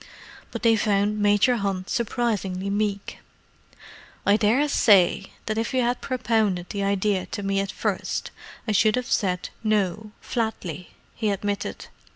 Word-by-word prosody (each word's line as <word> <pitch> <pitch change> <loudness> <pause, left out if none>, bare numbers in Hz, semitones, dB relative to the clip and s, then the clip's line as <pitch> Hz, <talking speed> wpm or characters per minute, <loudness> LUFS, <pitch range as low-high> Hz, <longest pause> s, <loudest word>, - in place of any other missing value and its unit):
But - - -7
they 230 -1 +5
found 210 -1 +1
Major 205 +4 +4
Hunt 195 -3 -2
surprisingly 205 -5 -1
meek. 200 -1 -2 1.1
"I 200 - +5
daresay 215 -5 +4 0.2
that 215 0 -1
if 230 +3 -2
you 255 - +3
had 245 +1 0
propounded 215 -8 0
the 200 -1 -2
idea 200 -1 0
to 205 - -5
me 195 0 0
at 195 0 -2
first - - -2 0.4
I - - +1
should 215 +1 +4
have 250 +1 -3
said 180 -3 0
'No' 215 -1 0
flatly," 190 - -4 0.2
he 220 -2 -1
admitted. 200 0 -3
205 Hz, 140 wpm, -24 LUFS, 195-225 Hz, 1.1 s, they